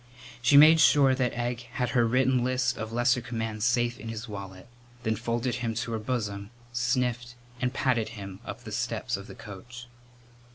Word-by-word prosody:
She 130 +4 +5
made 155 +2 +9
sure 140 -3 +6
that 130 -2 0
Egg 120 0 -2
had 125 -3 -1
her 120 -2 +3
written 130 +1 +2
list 130 0 +1
of 110 -1 -5
lesser 120 +2 +2
commands 115 -2 -3
safe 120 0 +1
in 110 +2 -7
his 115 +2 -6
wallet, 95 -3 -8 0.4
then 110 -1 0
folded 120 +2 -2
him 115 -2 -2
to 115 +1 -3
her 115 - -2
bosom, 105 -4 -3 0.2
sniffed, 120 0 -1 0.3
and 125 -1 +1
patted 125 -4 0
him 95 -1 -8
up - - -8
the 110 - -8
steps 120 +2 -2
of 100 0 -8
the - - -10
coach. 120 +4 -10
120 Hz, 180 wpm, -28 LUFS, 110-125 Hz, 0.4 s, made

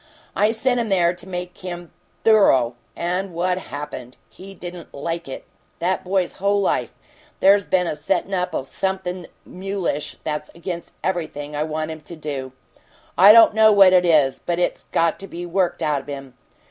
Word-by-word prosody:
I 210 - +3
sent 245 +2 0
him 230 -2 -2
there 175 -3 +3
to 175 +1 -11
make 180 -1 -6
him 175 -2 -7 0.3
THOROUGH. 135 - +4 0.2
And 180 +1 -2
what 180 +1 0
happened? 145 -6 -8
He 195 +11 -12
didn't 175 -1 -9
LIKE 165 +3 -4
it! 135 - -8 0.3
That 180 +2 -1
boy's 185 -1 -1
whole 200 +1 +1
life, 195 - 0 0.5
there's 200 0 +5
been 180 -1 +2
a 165 - -2
settin' 155 +5 -1
up 180 -2 -1
o' - - -1
something 185 +4 -4 0.2
mulish 185 -5 -4
that's 150 -1 -3
against 170 0 -6
everything 155 -5 -3
I 145 - -1
want 155 0 -2
him 160 -1 -8
to 170 +3 -10
do. 140 -4 -5 0.6
I 195 +3 +9
don't 225 -1 +8
know 220 0 +6
what 195 -2 +7
it 180 -1 +5
is, 150 -6 +3
but 175 -1 -1
it's 175 - -1
got 165 -1 0
to 195 - -8
be 175 -1 -7
worked 180 +1 0
out 150 -2 0
of - - -21
him. 135 -2 -7
175 Hz, 180 wpm, -22 LUFS, 155-190 Hz, 0.6 s, I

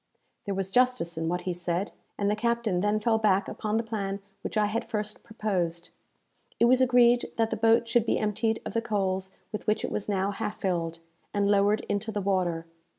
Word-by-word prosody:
There 200 -2 -2
was 190 0 -2
justice 250 -7 +2
in 160 0 -2
what 180 +1 -1
he 180 0 -2
said; 175 +2 -2 0.3
and 200 - 0
the 210 - +2
captain 235 -4 0
then 210 +2 +2
fell 220 +1 +2
back 200 -3 +2
upon 215 0 -2
the 230 - 0
plan 200 -3 -3 0.2
which - - -4
I 210 - +4
had 215 +3 -1
first 210 -1 -4
proposed. 180 -7 -2 0.7
It - - +6
was 255 +2 +5
agreed 245 -1 +4
that 225 -1 +1
the - - 0
boat 225 +1 +3
should 235 -1 +2
be - - +2
emptied 220 +1 0
of - - -5
the 230 - +1
coals 190 -4 -1 0.2
with 210 - -6
which 215 - +1
it - - -5
was 210 - -3
now 195 0 +1
half 210 +1 -4
filled, 170 -4 -1 0.4
and 200 0 +2
lowered 205 +1 +3
into 205 +2 -1
the 210 - -2
water. 180 -4 0
210 Hz, 210 wpm, -28 LUFS, 190-225 Hz, 0.7 s, It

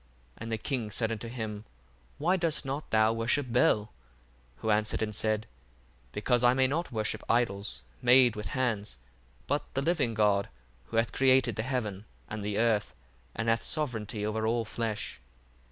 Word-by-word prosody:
And 115 0 -7
the 110 - 0
king 120 -2 -2
said 110 +2 -1
unto 115 +1 -4
him, 110 -3 -5 0.5
Why 175 +6 +2
dost 165 -5 +1
not 140 +3 -4
thou 110 0 +4
worship 115 +5 +1
Bel? 115 -3 +4
1:5 - - -14 0.8
Who 110 - 0
answered 105 0 +1
and 105 -1 -3
said, 110 0 0 0.7
Because 120 - +1
I 120 +1 +5
may 130 0 +4
not 155 +6 -1
worship 110 -1 -1
idols 105 -4 0 0.2
made 125 -1 +6
with 105 -2 -5
hands, 110 -5 -1 0.5
but - - 0
the 135 - +1
living 140 -8 +1
God, 105 -2 +2 0.4
who 90 - -4
hath 115 0 +2
created 130 -3 +4
the 110 - -1
heaven 110 -5 -3 0.2
and 105 -1 -5
the 105 0 -2
earth, 110 -3 +1 0.4
and 115 - -2
hath 115 0 +3
sovereignty 110 -8 -2
over 110 +1 -1
all 115 0 +1
flesh. 110 - -4
115 Hz, 170 wpm, -30 LUFS, 105-125 Hz, 0.8 s, made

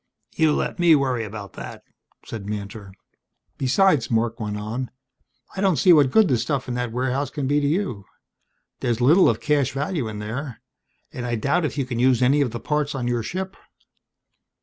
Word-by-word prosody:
"You 155 -2 +3
let - - -2
me 170 -2 +6
worry 130 -5 0
about 105 -2 -8
that," - - -9 0.4
said 105 -3 -7
Mantor. 100 -1 -6 0.7
"Besides," 140 0 +3
Marc 115 +1 0
went 105 -2 -3
on, 115 +5 -4 0.7
"I 190 - -3
don't 190 -3 +3
see 180 +3 +5
what 145 -4 +5
good 220 +6 +5
the 125 -5 +1
stuff 135 +3 -2
in 125 - -3
that 125 -1 -2
warehouse 130 +3 -1
can 145 -3 -4
be 145 +2 +2
to 145 - +1
you. 145 - -2 0.7
There's 120 -1 -1
little 155 +10 +5
of - - 0
cash 145 -3 +1
value 145 -1 -2
in 110 -1 -6
there. 115 +5 -5 0.5
And 125 - -5
I 120 -1 -1
doubt 140 +9 +1
if 145 -1 -4
you 135 - 0
can 120 -2 -4
use 125 0 +3
any 140 +4 +4
of 135 - +1
the 120 +1 -6
parts 150 +1 -1
on 125 -2 -2
your 120 -1 0
ship." 190 - -5
130 Hz, 195 wpm, -23 LUFS, 115-150 Hz, 0.7 s, me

